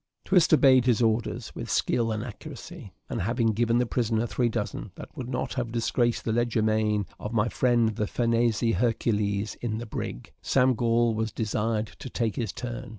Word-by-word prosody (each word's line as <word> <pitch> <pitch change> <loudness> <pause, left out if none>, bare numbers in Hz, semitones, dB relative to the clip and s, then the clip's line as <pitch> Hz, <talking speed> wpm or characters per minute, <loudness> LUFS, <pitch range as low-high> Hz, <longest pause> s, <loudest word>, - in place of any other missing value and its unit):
Twist 180 -4 +4
obeyed 130 -4 +6
his 120 -4 +3
orders 110 0 -1
with - - -6
skill 115 -2 +1
and 110 0 -2
accuracy; 135 - -9 0.2
and - - -3
having 115 +4 +1
given 115 +2 +2
the 125 - +2
prisoner 115 -1 0
three 120 +1 0
dozen, - - -4
that - - -11
would 125 -1 -6
not 125 - -2
have 120 -3 -3
disgraced 120 0 0
the 115 - 0
leger 120 0 +1
de - - +1
main 105 -1 +1
of 105 - -5
my 110 -1 +2
friend 120 -3 +2
the 105 -1 -2
Farnese 115 -1 +1 0.2
Hercules 105 -2 0
in 110 -3 -2
the 120 - -5
brig, 105 - -6
Sam 130 -1 +3
Gall 115 0 +2
was 110 0 -2
desired 110 0 -1
to - - -7
take 115 -4 -1
his 110 -5 -2
turn. 125 0 -6
115 Hz, 190 wpm, -27 LUFS, 110-120 Hz, 0.2 s, obeyed